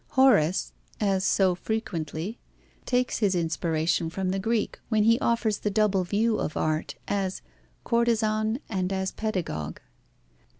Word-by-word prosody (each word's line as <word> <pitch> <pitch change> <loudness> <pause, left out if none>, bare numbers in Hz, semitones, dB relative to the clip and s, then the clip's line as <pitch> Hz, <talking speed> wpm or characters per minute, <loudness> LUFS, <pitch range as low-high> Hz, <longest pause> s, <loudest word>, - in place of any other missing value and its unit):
Horace, 190 -11 +4 0.3
as 195 -3 +1
so 190 -2 +3
frequently, 185 -1 -4 0.5
takes 250 0 +1
his 200 -4 +2
inspiration 165 0 0
from 185 +2 -2
the 195 +1 0
Greek, 225 +2 -1
when 215 -2 +3
he 230 +2 +4
offers 230 -3 +1
the 210 - -1
double 205 -2 +2
view 215 +4 +1
of 155 - -3
art: 155 0 -1
as 195 -2 -2 0.4
courtezan 225 0 +1
and 185 -3 -2
as 190 0 -1
pedagogue. 170 - -3
200 Hz, 130 wpm, -27 LUFS, 175-220 Hz, 0.5 s, Horace